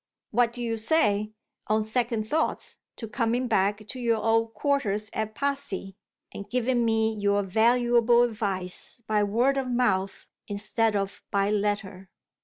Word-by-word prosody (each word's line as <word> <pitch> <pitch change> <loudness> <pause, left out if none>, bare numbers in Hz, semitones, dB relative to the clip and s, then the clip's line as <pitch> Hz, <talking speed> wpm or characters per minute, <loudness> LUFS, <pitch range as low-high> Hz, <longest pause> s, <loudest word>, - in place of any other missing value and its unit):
What 235 +1 +3
do 245 0 -6
you 230 -1 -1
say 215 -4 +1 0.4
(on 215 +1 +2
second 230 -1 -1
thoughts) 315 +6 -1 0.2
to 225 - -7
coming 235 +2 0
back 205 -1 +1
to 255 - -6
your 230 -2 +1
old 225 +1 +1
quarters 215 -6 0
at 215 0 -3
Passy, 275 -9 -3 0.4
and 200 - -8
giving 250 0 +1
me 225 -1 +2
your 205 -1 +1
valuable 240 +3 +4
advice 205 -1 -3
by 215 -1 +1
word 235 +7 +2
of 265 -2 -1
mouth 200 -6 0 0.2
instead 215 +2 0
of 195 -1 -2
by 200 +1 +1
letter? 205 -2 -2
220 Hz, 145 wpm, -26 LUFS, 205-240 Hz, 0.4 s, valuable